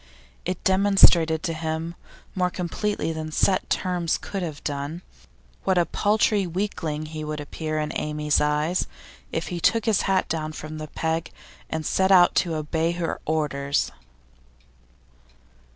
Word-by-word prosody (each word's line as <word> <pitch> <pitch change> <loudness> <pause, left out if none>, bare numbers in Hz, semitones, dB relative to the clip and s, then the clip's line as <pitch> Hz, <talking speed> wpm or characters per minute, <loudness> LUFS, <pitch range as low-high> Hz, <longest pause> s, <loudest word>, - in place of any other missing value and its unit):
It 180 0 -3
demonstrated 190 -5 +5
to 165 - -1
him 160 +1 -3 0.4
more 180 -1 +1
completely 180 0 -2
than 155 0 -5
set 185 +4 +2
terms 175 -3 0
could 195 - -5
have 155 -5 -5
done 145 +4 -4 0.6
what 190 -1 +2
a 175 - +4
paltry 210 -1 +2
weakling 165 -4 -2
he 155 0 -6
would 150 0 -4
appear 155 +1 -4
in 150 0 -1
Amy's 150 -1 0
eyes 150 +4 +1 0.4
if 165 - -2
he 175 - -3
took 225 +5 +2
his 220 -4 +3
hat 190 -1 +2
down 155 -1 -2
from 155 0 -7
the 155 - -5
peg 160 +2 -2 0.4
and 160 -1 -3
set 190 +4 +2
out 180 -2 +7
to 170 -3 +2
obey 160 +2 0
her 170 -1 -3
orders. 145 -3 0
165 Hz, 145 wpm, -25 LUFS, 155-185 Hz, 0.6 s, out